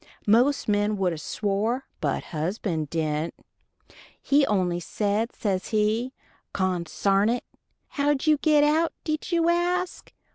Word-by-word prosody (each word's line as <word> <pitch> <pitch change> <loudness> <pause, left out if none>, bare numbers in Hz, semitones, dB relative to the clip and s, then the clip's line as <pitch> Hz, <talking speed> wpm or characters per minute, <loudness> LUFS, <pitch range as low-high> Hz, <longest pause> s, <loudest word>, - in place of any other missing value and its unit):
Most 245 +7 +3
men 205 0 +1
would 185 -3 +1
a - - -5
swore, 215 - -1
but - - -1
husband 160 -1 -2
dident. 155 0 -1 0.9
He 285 0 +3
only 180 -4 +1
said, 210 +5 -1
says 190 -3 -2
he, 220 +3 0 0.4
"Consarn 190 +3 +1
it." 245 +1 -1 0.5
How 290 0 +1
did 270 - -5
we 305 -1 +4
get 300 0 +4
out, 315 +3 +2
did 310 +3 -3
you 335 -1 +2
ask? 355 +1 0
215 Hz, 135 wpm, -25 LUFS, 185-290 Hz, 0.9 s, we